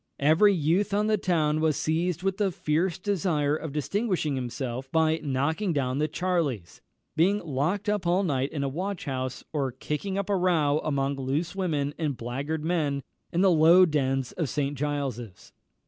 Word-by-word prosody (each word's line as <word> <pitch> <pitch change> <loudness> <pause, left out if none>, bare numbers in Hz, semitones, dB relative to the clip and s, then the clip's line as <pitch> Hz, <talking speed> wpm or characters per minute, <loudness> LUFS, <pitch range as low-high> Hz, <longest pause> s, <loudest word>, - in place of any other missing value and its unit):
Every 160 +9 +5
youth 185 +4 +1
on 210 +1 +2
the 215 0 +2
town 155 -5 +1
was 155 -2 +1
seized 170 +2 -1
with 195 0 0
the 205 -2 +2
fierce 165 +2 0
desire 170 -7 0
of 160 -1 -5
distinguishing 165 - -1
himself 130 0 -4
by 160 0 +2
knocking 155 +7 0
down 135 -2 -1
the 155 - +1
"charlies," 155 - -2 0.3
being 180 +6 +3
locked 170 +5 -2
up 205 -4 0
all 180 +3 +3
night 135 -6 0
in 145 -3 -3
a - - 0
watch 180 +7 -4
house, 130 -2 -4
or 140 -4 0
kicking 150 +9 -4
up 200 -1 -2
a 205 - +1
row 160 -5 +2
among 140 -2 -1
loose 145 +7 -2
women 150 -7 -1
and 150 -5 -1
blackguard 140 +6 -4
men 150 -5 0 0.3
in 170 - +1
the 190 -1 +5
low 170 +3 +7
dens 135 -5 0
of 160 -6 -3
St. 145 -1 -1
Giles's. 135 -8 -4
155 Hz, 175 wpm, -27 LUFS, 140-180 Hz, 0.3 s, low